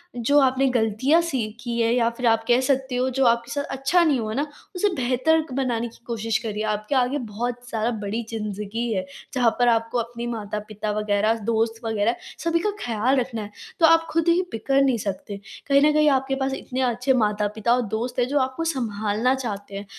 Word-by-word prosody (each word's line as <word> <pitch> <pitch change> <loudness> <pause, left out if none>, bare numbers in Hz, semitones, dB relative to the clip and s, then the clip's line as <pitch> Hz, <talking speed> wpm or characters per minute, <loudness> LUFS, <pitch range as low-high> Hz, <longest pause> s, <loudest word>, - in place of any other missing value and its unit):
जो 245 +4 +2
आपने 265 0 +3
गलतियाँ 240 +8 +3
सीखी 240 -6 -3
हैं, 230 0 +2
या 235 -2 +3
फिर 250 - -3
आप 225 -1 +3
कह 245 0 +4
सकते 265 -1 0
हो, 255 +1 +1
जो 265 +1 +1
आपके 235 0 +2
साथ 285 - -1
अच्छा 290 +7 +3
नहीं 295 -6 +2
हुआ 215 -1 -3
ना, 285 +5 0 0.3
उसे 410 +3 +2
बेहतर 260 +5 +2
बनाने 245 -3 -1
की 230 - -15
कोशिश 225 -2 -1
करिए। 215 -1 -3
आपके 210 +6 -3
आगे 255 +2 +2 0.2
बहुत 240 +3 -2
सारा 225 +1 -1
बड़ी 220 +4 -2
ज़िंदगी 215 +1 -4
है, 185 -2 -2 0.3
जहाँ 245 -3 +3
पर 245 - +4
आपको 230 0 +1
अपने 235 +1 -4
माता-पिता 210 -2 -4
वग़ैरह, 210 +1 +2 0.2
दोस्त 225 0 0
वग़ैरह, 225 +1 +1 0.3
सभी 335 0 +2
का - - +1
ख़्याल 245 +4 +1
रखना 240 -3 -3
है, 205 0 -8 0.3
तो 330 - +6
आप 330 0 +5
खुद 330 +1 +1
ही 340 +2 +4
बिखर 270 +5 +1
नहीं 265 -3 +3
सकते। 200 +1 -4 0.3
कहीं 280 0 +5
न - - +2
कहीं 305 0 +4
आपके 270 0 -3
पास 265 0 -1
इतने 260 -1 -4
अच्छे 250 +1 +1
माता-पिता 210 +2 0
और 250 - +1 0.2
दोस्त 245 +2 -3
हैं, 245 - +2
जो 285 +2 +1
आपको 260 +4 -1
सँभालना 220 0 0
चाहते 205 -6 -5
हैं, 200 +1 -5
240 Hz, 200 wpm, -24 LUFS, 220-265 Hz, 0.3 s, तो